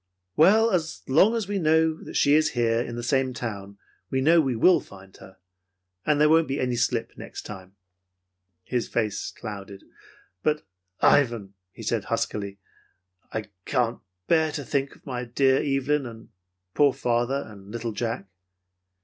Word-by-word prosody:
"Well, 220 +8 +5
as 165 -4 -1
long 190 - +5
as 220 -4 -2
we 200 -1 -1
know 160 -1 +2
she 140 - +3
is 155 +1 +3
here 115 -1 +2
in 120 -1 -5
the 120 - -5
same 130 0 +1
town, 100 -4 -6 0.3
we 130 - 0
know 160 +5 +5
we 135 -5 -1
will 180 +11 +5
find 95 -1 -15
her. 95 0 -15 0.7
And 150 -1 +3
there 150 - +6
won't 160 +1 +4
be 135 +2 -2
any 125 -1 0
slip - - 0
the - - -19
next - - -8
time." 95 -2 -10 0.9
His 120 +4 -2
face 105 -4 -2
clouded. 100 -3 -8 0.6
"But, 150 +4 0 0.4
Ivan," 115 -8 +3 0.2
he - - -11
said - - -1
huskily, 100 -1 -2 0.7
"I 110 -1 -5
can't 120 -3 0 0.3
bear 160 +2 +3
to 145 -3 -4
think 140 0 -1
of - - -24
my 125 -2 -4
dear 130 +2 +2
Evelyn, 140 0 0
and 115 -1 -11 0.4
poor 145 -2 +4
father, 120 +3 0
and 100 -2 -13
little 115 +1 -4
Jack." 115 0 -3
125 Hz, 160 wpm, -25 LUFS, 110-150 Hz, 0.9 s, there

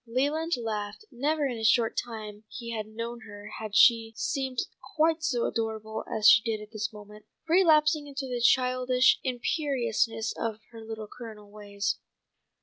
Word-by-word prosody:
Leland 290 +7 0
laughed. 215 - -4
Never 295 +4 0
in 245 -4 -2
the - - -5
short 225 +1 +3
time 215 -3 -5
he 235 -2 -7
had 215 -1 -4
known 230 +2 -6
her 205 0 -10
had 215 -2 -6
she 225 -1 +5
seemed 265 -1 -2 0.4
quite 320 +1 +3
so 250 -6 +1
adorable 220 -1 -3
as 215 -1 +3
she 220 - +9
did 225 -1 -2
at 210 0 -11
this 215 0 -3
moment, 210 0 -13 0.2
relapsing 310 -3 +4
into 275 -1 -5
the 250 -2 -3
childish 255 +1 +4
imperiousness 240 -4 0
of 225 -2 -3
her 225 -1 -10
Little 220 -1 -7
Colonel 215 -3 -11
ways. 205 -1 -3
230 Hz, 155 wpm, -28 LUFS, 215-260 Hz, 0.4 s, she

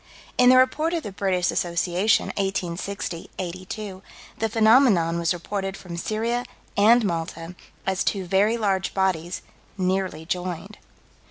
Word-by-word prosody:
In 250 0 +6
the 255 - +7
Report 305 +6 +3
of 330 - -2
the 205 - -5
British 185 -2 0
Association, 175 +4 +1
1860 190 -2 -3
82, 185 +2 -6 0.4
the 225 - 0
phenomenon 220 -7 +4
was 170 0 +1
reported 195 +2 -3
from 175 -2 -8
Syria 225 +7 -1 0.3
and 225 +3 +5
Malta, 165 -1 -3 0.3
as 190 -1 0
two 195 -3 -1
very 200 +5 +2
large 195 -4 0
bodies 185 -3 0 0.3
"nearly 185 -3 -1
joined." 180 +3 -4
190 Hz, 125 wpm, -24 LUFS, 175-215 Hz, 0.4 s, the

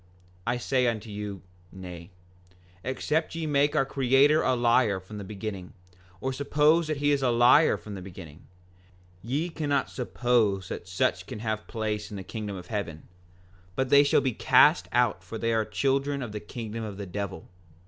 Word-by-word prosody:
5:25 90 - -30 0.4
I 125 - +1
say 125 +1 +1
unto 115 -1 -2
you, 105 -2 -6 0.3
Nay; 90 -2 -9 0.7
except 150 +6 -1
ye 165 -1 -3
make 145 0 +2
our 135 - +3
Creator 135 +3 +4
a 130 - +2
liar 120 -4 +3
from 105 +3 -10
the - - -6
beginning, 100 -2 -6 0.5
or 130 +4 -2
suppose 150 +4 +3
that 155 -2 -1
he 145 +1 +2
is 140 -1 +2
a 130 - +2
liar 120 +6 +5
from 105 - -9
the 95 - -6
beginning, 90 -4 -11 0.7
ye 140 +9 -1
cannot 145 -4 -1
suppose 120 -6 0
that 85 - -6
such 90 0 0
can 125 - -6
have 110 0 -3
place 105 -2 -3
in 105 - -7
the 95 - -6
kingdom 105 -1 -5
of 90 -2 -8
heaven; 85 -6 -4 0.7
but 130 -1 0
they 140 +1 +7
shall 140 - +3
be 130 -3 0
cast 90 -3 +5
out 120 -6 +1
for 95 +5 -7
they 115 +1 0
are 110 -1 +1
the - - -19
children 140 0 0
of 120 - -6
the 105 - -5
kingdom 115 0 -6
of 105 -3 -6
the 100 - -5
devil. 100 -2 -5
115 Hz, 190 wpm, -27 LUFS, 100-135 Hz, 0.7 s, they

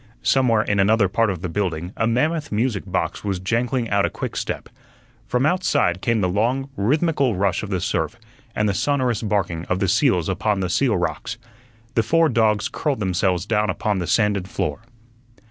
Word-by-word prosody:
Somewhere 120 -5 +3
in 100 -1 0
another 100 +1 +4
part 115 +4 +1
of 90 -2 -4
the - - -1
building 90 -1 -3
a 110 - 0
mammoth 150 +7 0
music 110 -1 -1
box 95 - -2
was 100 -2 -1
jangling 115 +5 0
out 100 0 +3
a - - +1
quickstep. - - -4 0.6
From 125 +2 +1
outside 155 - +1
came 115 -3 +1
the 90 - +2
long, 120 +9 0
rhythmical 140 - +1
rush 95 0 0
of 110 - -6
the 95 -2 -1
surf 100 - -1 0.4
and 105 - +1
the 100 - +1
sonorous 130 -2 0
barking 95 -6 -1
of 90 - -1
the 95 - 0
seals 90 - +2
upon 100 +2 0
the 90 -2 -1
seal 120 -1 +2
rocks. 90 +5 -3 0.6
The 115 - +3
four 165 +8 +3
dogs 110 -4 +2
curled 145 -5 -2
themselves 90 -2 0
down 105 -1 +1
upon 105 -3 -1
the 90 - -3
sanded 105 -4 +1
floor. - - -3
105 Hz, 180 wpm, -22 LUFS, 95-125 Hz, 0.6 s, another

